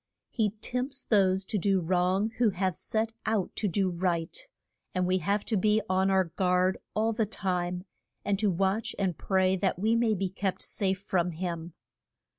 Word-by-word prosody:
He 220 -4 +1
tempts 255 +3 -2
those 190 -3 +3
to 210 +1 -1
do 195 +1 +2
wrong 185 +4 +1
who 240 -3 +5
have 190 -1 0
set 220 +5 -1
out 215 -4 0
to 210 - 0
do 190 0 +1
right, 170 -2 -1 0.6
and 185 0 +2
we 185 +1 +2
have 200 +5 0
to 225 - 0
be 210 +2 +3
on 190 +1 +2
our 190 -1 +4
guard 180 +1 +1 0.2
all 225 +1 +2
the 220 -1 0
time, 180 -3 -2 0.4
and 200 -1 +1
to 210 -1 +2
watch 195 +4 0
and 190 -4 0
pray 190 +1 +2
that 185 -1 0
we 220 +5 +2
may 230 -2 +2
be 190 0 -1
kept 190 -1 -2
safe 190 -1 -1
from 180 -3 0
him. 170 -1 -4
190 Hz, 180 wpm, -29 LUFS, 180-210 Hz, 0.6 s, who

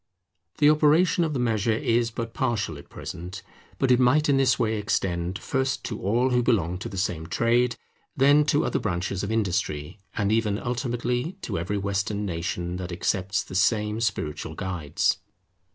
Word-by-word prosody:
The 150 0 +6
operation 155 +3 +4
of 155 -2 -1
the 135 - -1
measure 115 -2 +1
is 115 0 +1
but 115 0 -5
partial 115 - -1
at - - -15
present, 90 +3 -7 0.3
but 135 - +2
it 125 - +5
might 145 +5 +4
in 140 - +4
this 135 -2 +3
way 110 -1 0
extend, 90 -4 -1
first 135 +2 -1
to 110 - -5
all 120 +7 +2
who 125 0 +3
belong 90 -8 +1
to - - -5
the 95 - -7
same 85 -3 -2
trade, 120 +5 +2 0.4
then 145 +2 +6
to 145 0 +2
other - - 0
branches 90 -1 -2
of 100 - -3
industry, 95 -5 -1 0.2
and 100 -1 +1
even 110 -2 +1
ultimately 120 - -2
to - - -2
every 95 +5 -2
Western 100 +1 -1
nation 85 0 -3
that 90 -1 -5
accepts 95 +2 -1
the - - -11
same 105 +3 +1
spiritual 80 -9 -2
guides. 90 -6 -1
110 Hz, 170 wpm, -26 LUFS, 95-125 Hz, 0.4 s, The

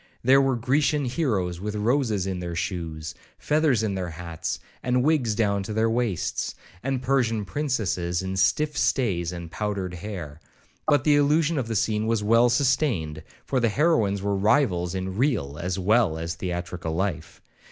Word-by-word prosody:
There 135 +2 +6
were 135 -1 +2
Grecian 140 +4 +1
heroes 110 - -1
with 105 +1 -3
roses 110 -2 +1
in 95 -2 -3
their 85 -1 -4
shoes, 80 -3 -4 0.2
feathers 150 -7 +2
in 105 -3 0
their 95 -2 -3
hats, 85 0 -5 0.2
and 125 0 +1
wigs 135 -8 +2
down 100 -3 +1
to 95 +2 -5
their 110 +1 +2
waists; 115 -7 -1 0.3
and 130 +1 -2
Persian 115 -6 +1
princesses 95 - -1
in 95 0 -3
stiff 95 +12 +2
stays 95 - +1
and 85 -2 -7
powdered 100 -3 -3
hair. 85 -5 -7 0.5
But 145 -3 +4
the 145 -1 +4
illusion 150 +2 +2
of 125 - -3
the 115 - -3
scene 110 +1 0
was 115 -2 +1
well 115 +3 +5
sustained, 120 - +1 0.2
for 135 - 0
the 120 -2 +2
heroines 110 - +2
were 100 0 0
rivals 95 -4 +2
in 95 0 -4
real 105 - 0
as 90 +2 -2
well 100 -3 +2
as 85 +1 -3
theatrical 90 -2 -4
life. 85 -3 -3
105 Hz, 165 wpm, -25 LUFS, 90-130 Hz, 0.5 s, There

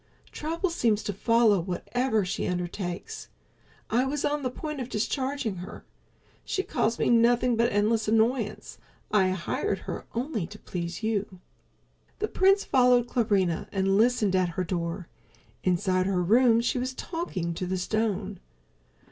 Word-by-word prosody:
Trouble 335 +4 -2
seems 225 -10 +1
to 205 - -3
follow 230 0 +3
whatever 215 +5 -1
she 180 - -2
undertakes. 180 0 -4 0.6
I 240 +3 +3
was 275 +2 -1
on 295 0 0
the 255 - -1
point 300 +3 -6
of 250 - -5
discharging 260 -1 -2
her. 180 +4 -9 0.6
She's 380 - -2
caused 230 -1 0
me - - +2
nothing 240 +1 +4
but 235 +1 +2
endless 215 +2 +1
annoyance. 225 0 0 0.3
I 195 -3 +4
hired 190 - -1
her - - -6
only 235 - -2
to 210 - -11
please 175 0 -5
you." 205 -4 -2 0.8
The 430 - -1
prince 390 +1 +3
followed 250 -2 +4
Clarinha 200 -8 +1
and 195 0 +1
listened 220 -3 +3
at 185 -1 +2
her 185 - +1
door. 170 0 -3 0.6
Inside 185 +1 +1
her 185 -2 +1
room 230 +4 +5
she 245 +2 0
was 255 +1 -3
talking 210 - -3
to 180 +2 -4
the 185 +1 -1
stone. 205 -1 -2
220 Hz, 150 wpm, -27 LUFS, 185-250 Hz, 0.8 s, room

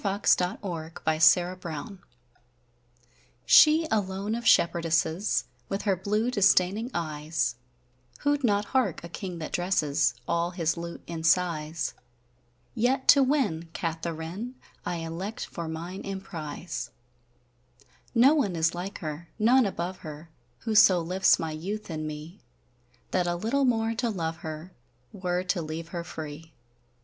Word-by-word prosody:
A 200 -1 -1
Seventeenth 165 -3 0
Century 175 +3 +5
Song 170 +4 -6 1.5
SHE 310 +2 +7
alone 200 0 -1
of 235 +1 -4
Shepherdesses 170 +2 +3 0.3
With 195 - -2
her 200 -3 +2
blue 210 +6 0
disdayning 200 +1 +3
eyes, 155 - -1 0.7
Wo'd 290 0 +2
not 205 -3 +2
hark 260 -8 +1
a 170 - -7
Kyng 180 0 -6
that 160 - -6
dresses 155 -7 +1
All 170 0 +1
his 170 -2 -1
lute 170 0 -7
in 165 -1 -5
sighes: 165 -2 +1 0.8
Yet 255 +3 +1
to 280 - +9
winne 255 - +1
Katheryn, 165 +6 -4 0.3
I 175 - -1
elect 170 +7 -5
for 170 -2 -6
mine 170 +4 -6
Emprise. 175 -4 -5 1.3
None 250 - +4
is 165 0 +2
like 180 +3 -5
her, 155 +1 -6
none 235 +2 +4
above 185 -1 -4
her, 155 +1 -10 0.3
Who 225 - -2
so 190 -4 +7
lifts 180 +3 +3
my 160 -1 -3
youth 190 +6 -5
in 155 -1 -3
me, 155 +4 -8 0.7
That 180 -1 +1
a 175 - 0
littel 235 +10 +1
more 225 -2 +1
to 235 +1 -1
love 165 -6 -3
her 160 +3 -7 0.4
Were 180 -1 -1
to 180 -1 -1
leave 160 +1 -6
her 170 -1 -4
free! 160 0 -8
175 Hz, 135 wpm, -27 LUFS, 160-205 Hz, 1.5 s, to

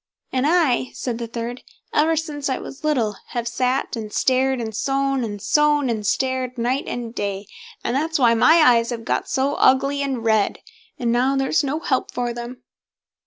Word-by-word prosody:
"And 260 +2 +1
I", 310 -7 +2
said 240 -2 -4
the 235 - -4
third, 235 +2 -5 0.3
"ever 320 +2 +3
since 295 -3 -3
I 260 - 0
was 275 - -9
little, 235 -10 0
I - - -11
have 235 0 -1
sat, 255 +3 -1
and 215 -2 -6
stared, 260 +2 +1
and 220 -2 -4
sewn, 275 +2 0
and 205 -2 -4
sewn 295 +2 +2
and 215 -3 -3
stared, 260 0 -1
night 250 +4 0
and 235 -2 -5
day; 200 -2 -3 0.4
and 235 - -1
that's 320 +3 0
why 240 -4 +4
my 320 +8 +5
eyes 235 -2 +4
have 230 -2 -5
got - - -1
so 270 +2 +1
ugly 275 +2 +3
and 265 -5 -2
red, 220 -2 +2 0.4
and 240 -4 0
now 255 +3 +2
there's 270 +3 +1
no 285 +3 -1
help 260 -5 0
for 240 -1 -2
them." 240 +1 -8
255 Hz, 190 wpm, -22 LUFS, 235-275 Hz, 0.4 s, my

